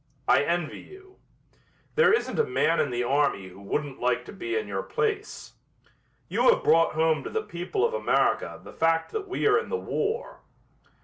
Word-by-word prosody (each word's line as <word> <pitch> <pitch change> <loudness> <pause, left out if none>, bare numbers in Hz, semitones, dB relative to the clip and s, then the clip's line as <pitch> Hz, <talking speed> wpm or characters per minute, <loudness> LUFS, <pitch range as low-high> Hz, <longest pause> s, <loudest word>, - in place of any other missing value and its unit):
I - - +5
envy 170 +1 -1
you. 385 0 -15 0.8
There 470 0 +5
isn't 445 - 0
a - - +5
man 380 - +1
in 145 - +1
the 120 0 -1
army 135 -7 +1
who 95 +2 -14
wouldn't 140 +7 -3
like 120 0 0
to - - -10
be 355 - -4
in 445 - -3
your - - -3
place. 425 -1 -3 0.7
You - - +3
have - - +3
brought 165 0 +4
home 160 0 +1
to - - -5
the 440 -1 -2
people 180 - -2
of 470 - -1
America 485 - +1
the - - -11
fact 165 0 +1
that 430 -2 -4
we 370 - -2
are 430 +1 +5
in 465 - -7
the 460 - -1
war." 450 +1 -3
195 Hz, 190 wpm, -26 LUFS, -, 0.8 s, I